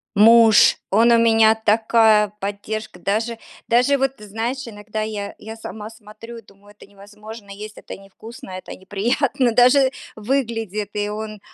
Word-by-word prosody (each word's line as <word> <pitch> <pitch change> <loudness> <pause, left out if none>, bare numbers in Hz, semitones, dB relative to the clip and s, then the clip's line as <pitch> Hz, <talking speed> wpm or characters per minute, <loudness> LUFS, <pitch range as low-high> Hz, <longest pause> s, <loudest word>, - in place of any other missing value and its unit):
Муж, 225 +1 +6
он 230 +4 +4
у 235 - +5
меня 225 -1 +4
такая 220 -1 +3
поддержка, 205 0 -6
даже 220 +5 -2 0.3
даже 250 +4 +3
вот 270 0 0
знаешь, 225 +6 -5
иногда 215 0 -6
я 205 -2 -6
я 220 +1 -10
сама 220 -1 -9
смотрю 225 +1 -13
и - - -11
думаю: 200 -1 -21
"Это 205 - -17
невозможно 210 +1 -13
есть. 210 +2 -10
Это - - -9
невкусно, 195 +3 -13
это 185 0 -8
неприятно 235 +7 -1
даже 255 +3 +4 0.2
выглядит". 225 -4 -3
И 205 0 -2
он 215 0 -7
220 Hz, 145 wpm, -20 LUFS, 205-230 Hz, 0.3 s, Муж